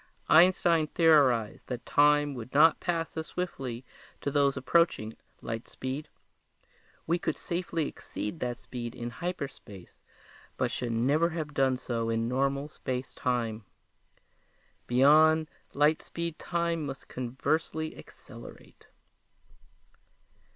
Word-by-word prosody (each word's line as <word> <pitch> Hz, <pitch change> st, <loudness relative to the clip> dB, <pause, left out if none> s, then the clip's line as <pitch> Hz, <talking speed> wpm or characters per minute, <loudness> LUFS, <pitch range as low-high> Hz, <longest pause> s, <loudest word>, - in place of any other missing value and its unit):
Einstein 170 Hz, -1 st, +5 dB
theorized 140 Hz, -10 st, +3 dB
that 125 Hz, -2 st, -5 dB
time 145 Hz, 0 st, +4 dB
would 125 Hz, -1 st, -8 dB
not 160 Hz, +2 st, +6 dB
pass 165 Hz, -2 st, -2 dB
as 160 Hz, -1 st, -4 dB
swiftly 130 Hz, -9 st, -5 dB, 0.3 s
to 140 Hz, -, -3 dB
those 140 Hz, -1 st, +2 dB
approaching 135 Hz, -6 st, +1 dB, 0.3 s
light 115 Hz, 0 st, -5 dB
speed. 130 Hz, +4 st, -5 dB, 1.0 s
We 170 Hz, +2 st, +1 dB
could -, -, -2 dB
safely 170 Hz, -3 st, -2 dB
exceed 105 Hz, +10 st, -6 dB
that 120 Hz, -1 st, -3 dB
speed 120 Hz, -1 st, -7 dB
in 120 Hz, -1 st, -5 dB
hyperspace 140 Hz, -, -7 dB, 0.6 s
but -, -, 0 dB
should 120 Hz, -2 st, -3 dB
never 140 Hz, +9 st, +2 dB
have 160 Hz, -3 st, -5 dB
done 135 Hz, -2 st, +2 dB
so 115 Hz, -2 st, -3 dB
in 115 Hz, 0 st, 0 dB
normal 135 Hz, +3 st, 0 dB
space 130 Hz, -3 st, -5 dB
time. 115 Hz, -3 st, -2 dB, 1.2 s
Beyond 155 Hz, +5 st, +5 dB, 0.2 s
light 150 Hz, +2 st, +3 dB
speed 170 Hz, -1 st, -5 dB
time 170 Hz, -2 st, -1 dB
must 135 Hz, -1 st, -8 dB
conversely 155 Hz, +5 st, -2 dB
accelerate! -, -, -14 dB
140 Hz, 115 wpm, -29 LUFS, 125-160 Hz, 1.2 s, not